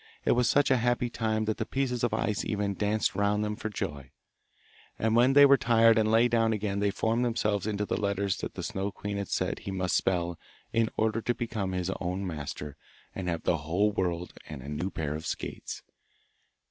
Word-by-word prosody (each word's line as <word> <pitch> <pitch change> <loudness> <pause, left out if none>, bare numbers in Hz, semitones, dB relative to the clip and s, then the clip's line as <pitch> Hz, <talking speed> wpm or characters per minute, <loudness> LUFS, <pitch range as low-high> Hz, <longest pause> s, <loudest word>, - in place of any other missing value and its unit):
It - - +4
was 120 -1 +3
such 145 -1 +3
a 130 - +5
happy 120 0 0
time 110 -1 0
that 110 0 -1
the - - -1
pieces 125 -3 -1
of 120 - +2
ice 105 -1 -1
even 100 -1 -1
danced 105 +2 0
round 100 +1 +1
them 105 0 -2
for 110 - -4
joy, 70 -9 -5 0.9
and 110 0 +1
when 125 +3 +5
they 145 +1 +9
were 140 0 +7
tired 115 -2 +5
and 110 0 +2
lay 115 +2 +5
down 115 -1 +2
again 100 -2 -2
they 100 0 +2
formed 110 +4 0
themselves 105 -4 0
into 105 -1 -1
the 105 - -2
letters 100 -1 0
that - - -6
the - - -5
Snow 95 +1 -2
queen 100 +1 -5
had 100 -1 -3
said - - -1
he - - -7
must 95 -2 -1
spell 85 -2 0 0.3
in 115 -1 +2
order 110 +1 +1
to 120 +2 0
become 110 -5 -3
his 90 0 -1
own 95 +1 -2
master 75 -3 -5 0.4
and 95 -2 -5
have 85 -2 -2
the 85 - +2
whole 90 +8 +1
world 90 -3 -2 0.2
and 70 -4 -7
a 70 - -7
new 75 +6 -2
pair 80 -5 -3
of 80 +1 -5
skates. - - -5
105 Hz, 210 wpm, -29 LUFS, 95-115 Hz, 0.9 s, they